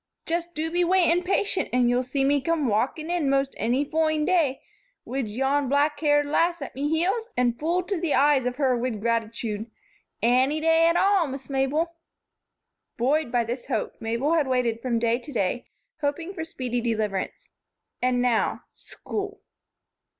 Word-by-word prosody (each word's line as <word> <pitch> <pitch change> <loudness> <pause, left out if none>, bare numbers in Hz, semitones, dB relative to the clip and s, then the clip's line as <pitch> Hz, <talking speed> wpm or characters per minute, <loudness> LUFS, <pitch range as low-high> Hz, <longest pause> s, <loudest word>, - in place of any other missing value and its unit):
Just 340 +1 -3
do 320 +2 -2
be 350 +1 +2
waitin' 350 -1 +3
patient 385 +1 0
and 245 -1 +3
you'll 245 +1 +2
see 260 +2 -1
me 285 0 +2
come 325 0 0
walkin' 265 +9 0
in 340 -6 +1
most 275 0 +1
anny 250 +5 +1
foine 310 0 +1
day 310 -7 +1 0.4
wid 255 -4 -3
yon 270 +4 0
blackhaired 290 +1 +2
lass 335 +4 +1
at 275 - -7
me 285 +2 -2
heels 385 +9 0
an' 245 -1 +3
full 335 +8 -1
to 360 -2 -3
the 335 -4 +1
eyes 280 -2 +4
of 250 - -2
her 265 -3 +2
wid 240 -2 -2
gratichude. 225 -1 -2 0.5
Anny 260 +6 +3
day 325 +1 +4
at 335 - +2
all, 390 -4 +3
Miss 270 +1 -7
Mabel." 300 +6 0 1.0
Buoyed 275 +3 +1
by 240 -1 +2
this 240 +2 -5
hope, - - -2
Mabel 235 +8 0
had 310 -4 +2
waited 245 -3 0
from 240 -2 0
day 230 +1 +1
to 290 - -11
day, 235 0 -1 0.3
hoping 325 +5 -2
for 320 - -4
speedy 250 -6 -3
deliverance. 215 -5 -2 0.5
And 250 0 +2
now, 240 -3 +1
school! 410 0 -6
280 Hz, 165 wpm, -25 LUFS, 245-325 Hz, 1.0 s, eyes